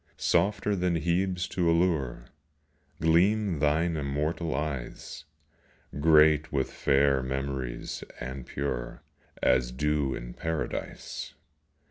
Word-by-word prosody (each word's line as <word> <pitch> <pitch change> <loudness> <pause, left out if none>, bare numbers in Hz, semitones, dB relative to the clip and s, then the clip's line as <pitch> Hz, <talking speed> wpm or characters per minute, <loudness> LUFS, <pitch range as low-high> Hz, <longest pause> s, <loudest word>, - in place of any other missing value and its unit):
26 - - -38
POESY. - - -1
Softer 105 +1 +2
than 90 -2 +1
Hebe's 90 +2 0
to 85 -2 +1
allure 80 -9 +1 0.7
Gleam 90 +3 +3
thine 80 +3 +2
immortal 75 +2 -2
eyes, 70 -4 -5 0.7
Great 75 0 +5
with 65 -2 -1
fair 70 -1 +3
memories, 65 -1 -4 0.2
and 65 +1 -6
pure 65 -4 -4 0.4
As 60 -1 +3
dew 75 +1 0
in - - -7
Paradise. 80 -1 -4
75 Hz, 105 wpm, -28 LUFS, 65-85 Hz, 0.7 s, Great